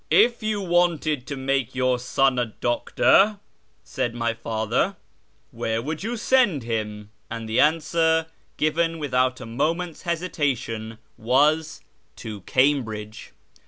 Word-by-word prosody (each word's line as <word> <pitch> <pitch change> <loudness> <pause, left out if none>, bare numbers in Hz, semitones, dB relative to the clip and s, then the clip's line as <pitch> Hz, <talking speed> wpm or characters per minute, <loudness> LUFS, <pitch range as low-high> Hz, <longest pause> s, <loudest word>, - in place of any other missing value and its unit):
" - - -42 0.2
If 240 0 -6
you 215 -1 -1
wanted 170 -6 +1
to 140 -2 -4
make 135 -2 -1
your 130 -1 +1
son 130 +1 +1
a 120 - 0
doctor," 195 - +2 0.5
said 120 -1 -3
my 115 -1 0
father, 115 - -1 0.3
" - - -41
where 110 0 -2
would 155 +6 -4
you 235 +4 -3
send 225 - +2
him? 105 -2 -4
" - - -42
And 115 -1 -5
the 110 - 0
answer, 160 +1 +3 0.3
given 165 +2 +1
without 130 -4 0
a 125 - -8
moment's 160 +8 -2
hesitation, 135 -11 -2 0.2
was, 150 +7 +2 0.2
" - - -42
To 105 -3 -8
Cambridge." 115 -6 0
135 Hz, 140 wpm, -24 LUFS, 115-165 Hz, 0.5 s, answer